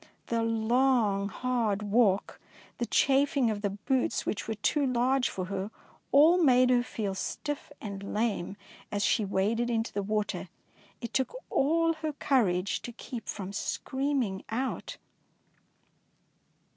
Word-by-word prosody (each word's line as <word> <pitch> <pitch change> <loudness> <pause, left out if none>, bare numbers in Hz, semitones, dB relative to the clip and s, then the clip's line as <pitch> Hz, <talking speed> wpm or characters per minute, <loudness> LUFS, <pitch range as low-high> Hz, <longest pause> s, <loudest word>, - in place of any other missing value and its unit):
The 230 -1 +1
long 225 -2 +2
hard 225 -3 -1
walk, 205 -2 +2 0.4
the 240 - -1
chaf 275 +1 +3
ing 245 -5 +3
of 205 -1 -4
the 205 - 0
boots 225 +5 -1
which 205 - -3
were 220 - -2
too 285 +8 +1
large 255 +1 +2
for 185 - -4
her, 195 +1 -3 0.4
all 320 +6 +6
made 255 -4 +5
her 245 -1 +4
feel 215 -5 -3
stiff 290 +10 -4
and 200 -2 -6
lame, 210 -5 0
and 200 - -9 0.3
as 205 -1 0
she 220 - +2
waded 210 +5 0
into 225 -1 -1
the 200 - -1
water, 210 +1 -2 0.5
it 235 -2 -6
took 265 - 0 0.2
all 330 +4 +3
her 310 -1 -2
courage 200 -10 +1
to 240 - -6
keep 235 0 -8
from 195 -1 -5
screaming 265 -3 -2
out. 255 +4 -3
230 Hz, 145 wpm, -29 LUFS, 205-265 Hz, 0.5 s, all